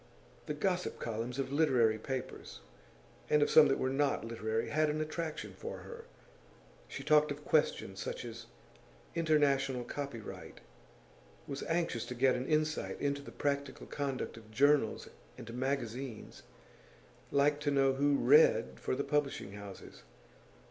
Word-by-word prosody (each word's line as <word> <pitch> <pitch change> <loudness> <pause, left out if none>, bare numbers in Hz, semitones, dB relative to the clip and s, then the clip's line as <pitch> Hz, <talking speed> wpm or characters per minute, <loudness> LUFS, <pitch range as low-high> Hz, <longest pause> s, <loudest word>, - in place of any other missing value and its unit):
The 150 - -2
gossip 180 +3 -1
columns 115 +3 -4
of 135 -1 -2
literary 125 -8 +3
papers 130 +3 -6 0.7
and 150 -1 +5
of - - 0
some 155 - +8
that 135 - +2
were 130 - 0
not 135 -3 +1
literary 115 -1 -2
had 155 +1 +2
an 150 +1 -1
attraction 155 +1 -4
for - - -7
her. 470 0 -10 0.8
She 135 - -7
talked 150 +1 +4
of 145 +1 -6
questions 100 -10 +1
such - - -4
as 115 0 -8 0.7
international 140 -6 +2
copyright, 120 -2 -7 0.8
was 140 0 -5
anxious 165 -8 0
to 125 - -5
get 130 +1 +4
an 125 +1 -3
insight 155 0 0
into 140 0 -1
the 140 - -10
practical 140 -1 -2
conduct 135 -5 -3
of 110 -1 -13
journals 140 +1 +2 0.3
and 115 0 -8
magazines, 130 -2 -4 0.9
liked 145 +1 +2
to 150 - 0
know 135 -1 +3
who 140 +1 +2
'read' 470 - +5
for - - -1
the - - -1
publishing 145 -8 -1
houses. 100 -1 -10
140 Hz, 140 wpm, -33 LUFS, 120-150 Hz, 0.9 s, some